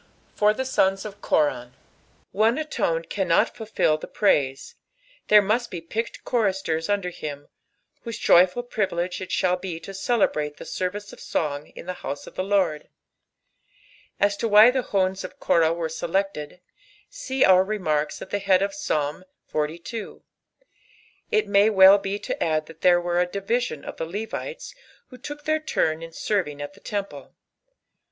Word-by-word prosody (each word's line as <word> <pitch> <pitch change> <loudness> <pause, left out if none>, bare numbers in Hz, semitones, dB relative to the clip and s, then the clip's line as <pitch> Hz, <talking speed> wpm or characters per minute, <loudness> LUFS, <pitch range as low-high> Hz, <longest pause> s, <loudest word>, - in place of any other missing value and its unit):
For 210 0 +3
the 260 +5 -3
Sods 195 -6 +1
o( 215 - -4
Korab. 135 -10 0 0.6
One 220 +6 +2
alone 170 - -1
cannot 180 -2 +1
futJU 185 -8 0
the - - -7
prtdM, 135 -10 +1 0.5
there 210 -1 +7
must 230 +4 0
be 175 - -5
picked 220 +8 -5
choristers 190 -8 0
under 200 -3 0
him, 145 -3 -7 0.5
whose 230 -2 -6
joiifal 185 +8 +4
privilege 185 -6 -2
it 185 - -6
shall 180 -1 +1
be 180 -3 -6
to 195 - -8
cdebraU 195 -8 0
the - - -9
ssrrice 200 +3 -4
cf - - -13
song 145 -1 -2
in - - -9
the 180 - -3
house 140 +1 -5
cf - - -12
the 185 - -2
Lord. 190 -6 0 1.3
As 205 0 +2
to 230 - -1
v>hy 215 +3 +8
the 260 - +1
Sons 190 -1 +1
qf 185 - -8
Korah 165 -1 +3
wers 165 -1 -3
sdteled, 180 -2 -2 0.5
see 280 - 0
our 185 0 +6
remarks 155 -8 -1
at - - -13
Iht 205 - -1
hnid 190 -1 +4
qf 200 0 -1
Psalm 150 -4 -2 0.3
XLII. 165 +9 -4 1.1
It 430 - +2
may 200 +2 +4
be 215 - -3 0.4
teeii - - -18
to - - -2
add 155 -1 0
thai 165 - -12
tliey 175 +2 +3
were 175 0 +1
a 180 - +1
diluion 200 - -2
of - - -7
the 165 - -3
LeoHts 225 - -6 0.4
loho 250 -1 -13
took 295 +1 -7
their 310 +1 +1
turn 160 - 0
in 165 0 -8
serving 165 -6 -2
ai 145 0 -5
the 200 - -18
templt. 195 -10 -5
190 Hz, 165 wpm, -24 LUFS, 165-210 Hz, 1.3 s, v>hy